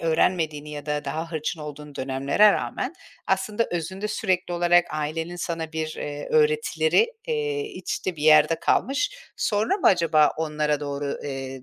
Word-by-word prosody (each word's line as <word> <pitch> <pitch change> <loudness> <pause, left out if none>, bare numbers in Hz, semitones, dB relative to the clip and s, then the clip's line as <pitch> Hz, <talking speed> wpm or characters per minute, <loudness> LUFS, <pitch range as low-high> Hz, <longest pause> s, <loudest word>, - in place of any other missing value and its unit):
öğrenmediğin 160 -2 +1
ya 150 -1 -8
da 150 0 -2
daha 160 +4 -4
hırçın 160 +1 -3
olduğun 150 -1 -8
dönemlere 140 +11 +3
rağmen 255 +7 -3 0.3
aslında 205 +4 0
özünde 190 +5 -3
sürekli 185 -4 -1
olarak 175 0 +4
ailenin 160 +3 -3
sana 165 -2 -4
bir, 155 0 -3
eee, 145 0 -5
öğretileri, 460 0 +3 0.2
eee, 445 -2 -1
içte 360 - -4
bir 150 - -7
yerde 155 +1 +5
kalmış, 280 +10 +1 0.3
sonra 215 - +1
mı 410 - 0
acaba 165 -4 +5
onlara 150 -2 -1
doğru, 140 -1 -3
eee, 135 -2 -5
165 Hz, 145 wpm, -25 LUFS, 150-205 Hz, 0.3 s, yerde